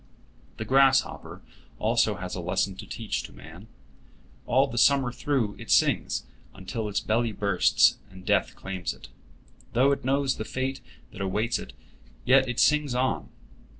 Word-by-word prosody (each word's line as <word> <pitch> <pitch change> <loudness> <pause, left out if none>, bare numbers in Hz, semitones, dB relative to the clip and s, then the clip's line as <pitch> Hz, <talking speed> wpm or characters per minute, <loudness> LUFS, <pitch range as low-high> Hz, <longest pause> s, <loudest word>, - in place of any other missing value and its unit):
The 110 - -5
grasshopper 135 +3 +2 0.3
also 110 -1 +1
has 90 0 -6
a 90 - -4
lesson 90 +2 -1
to - - -9
teach 110 -2 -3
to - - -11
man. 80 - -13 0.8
All 130 +3 +4
the 120 -3 -3
summer 135 -2 +4
through 120 -5 -1
it - - -10
sings, - - +2 0.3
until 105 +3 -5
its 100 - 0
belly 115 +1 0
bursts, 100 -3 +3
and 95 -1 -14
death - - +1
claims 95 -8 -5
it. - - -14 0.6
Though 135 +4 +4
it 140 - -1
knows 135 +1 +1
the - - -3
fate 130 +3 -3 0.3
that 95 - -9
awaits 105 +5 -1
it, - - -10 0.5
yet 130 -1 +4
it 125 - -3
sings 150 -4 +3
on. 130 +1 -1
115 Hz, 155 wpm, -26 LUFS, 95-130 Hz, 0.8 s, All